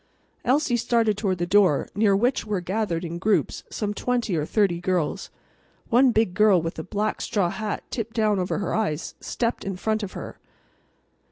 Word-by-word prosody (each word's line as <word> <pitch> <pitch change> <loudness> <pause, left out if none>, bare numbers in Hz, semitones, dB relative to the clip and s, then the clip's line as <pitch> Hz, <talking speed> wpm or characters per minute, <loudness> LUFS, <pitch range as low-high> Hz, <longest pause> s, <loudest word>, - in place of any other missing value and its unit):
Elsie 260 -1 +2
started 230 -2 +2
toward 195 -3 -1
the 175 - -1
door, 185 -5 +3
near 205 -1 +3
which 240 +6 +1
were 210 -3 -2
gathered 180 -2 -2
in 170 +1 -5
groups 205 +3 0
some 210 -1 -3
twenty 240 -3 -1
or 155 -1 -1
thirty 195 -6 +2
girls. 180 -4 -1 0.6
One 250 +2 +5
big 220 -5 +1
girl 205 -1 +5
with 165 0 -4
a - - -4
black 210 +4 -2
straw 185 -5 0
hat 215 -1 -4
tipped 230 -1 -4
down 215 -3 +2
over 180 - -1
her 200 -4 -2
eyes 180 -7 -1
stepped 235 0 -2
in 195 -1 -3
front 215 +3 -1
of 200 -3 -5
her. - - -8
205 Hz, 180 wpm, -24 LUFS, 180-220 Hz, 0.6 s, One